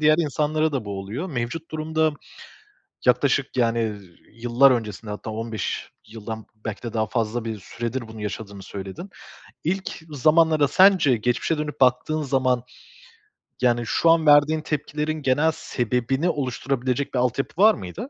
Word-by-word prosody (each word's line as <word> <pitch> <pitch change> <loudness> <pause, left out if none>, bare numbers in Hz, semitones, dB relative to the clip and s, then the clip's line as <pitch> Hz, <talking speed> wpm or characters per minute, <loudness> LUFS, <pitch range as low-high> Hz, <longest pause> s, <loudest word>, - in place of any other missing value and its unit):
diğer 155 0 +5
insanlara 155 0 0
da 130 -6 -2
bu 100 -1 -5
oluyor. 110 - -5
Mevcut 130 +6 -4
durumda 155 0 0 0.9
yaklaşık, 130 +2 +2
yani, 115 -1 +2
ııı, 105 -2 -4 0.3
yıllar 120 +4 +4
öncesinde, 110 -3 -2
hatta 105 +1 -6
15 110 -2 -4 0.2
yıldan 110 0 -7 0.2
belki 110 -3 -5
de 120 - -5
daha 110 -1 0
fazla 115 +1 -2
bir 110 -2 -4
süredir 115 +4 -5
bunu 110 -1 -10
yaşadığını 100 -1 -6
söyledin. 100 - -8 0.5
İlk 190 -1 -3
zamanlara, 155 +1 +3
sence 185 -10 +5
geçmişe 125 +8 0
dönüp 150 -2 -4
baktığın 130 +5 +2
zaman, 130 -3 +1 1.0
yani, 120 -1 +2
şu 165 - +2
an 165 -1 +4
verdiğin 150 +1 +5
tepkilerin 150 +1 -3
genel 145 +4 +2
sebebini 125 +7 -1
oluşturabilecek 130 -1 -2
bir 125 - +1
altyapı 125 - -1
var 215 +1 +8
mıydı? 200 - -7
130 Hz, 145 wpm, -24 LUFS, 115-155 Hz, 1.0 s, var